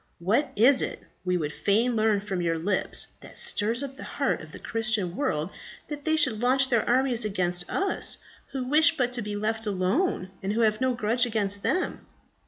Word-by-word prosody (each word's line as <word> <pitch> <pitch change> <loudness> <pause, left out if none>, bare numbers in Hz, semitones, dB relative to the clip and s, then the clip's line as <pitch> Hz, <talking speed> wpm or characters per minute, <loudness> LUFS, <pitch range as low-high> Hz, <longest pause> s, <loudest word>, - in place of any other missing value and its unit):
What 215 - 0
is 255 +5 +5
it, - - -4 0.2
we 180 -1 0
would 150 -3 -3
fain 230 +4 +1
learn 215 -2 +2
from 195 -3 -3
your 165 -1 0
lips, 185 +4 +3
that - - -13
stirs 230 +5 +2
up 270 -1 -7
the - - -9
heart - - -2
of - - -12
the - - -10
Christian 220 -6 -1
world 185 - -2 0.4
that 290 -1 -7
they 315 - +2
should 255 -8 +3
launch 260 +2 +3
their 235 -3 +2
armies 250 -1 +2
against 180 -4 0
us, 390 0 +1 0.3
who 270 -2 -3
wish 310 +4 +4
but 250 -2 0
to 245 - -1
be 210 -1 -5
left 220 +1 -2
alone, 190 - -1
and 195 +2 -2
who 230 - 0
have 215 +1 +1
no 260 -1 +1
grudge 240 +2 +1
against 205 -3 0
them? 365 - -2
220 Hz, 195 wpm, -26 LUFS, 195-255 Hz, 0.4 s, is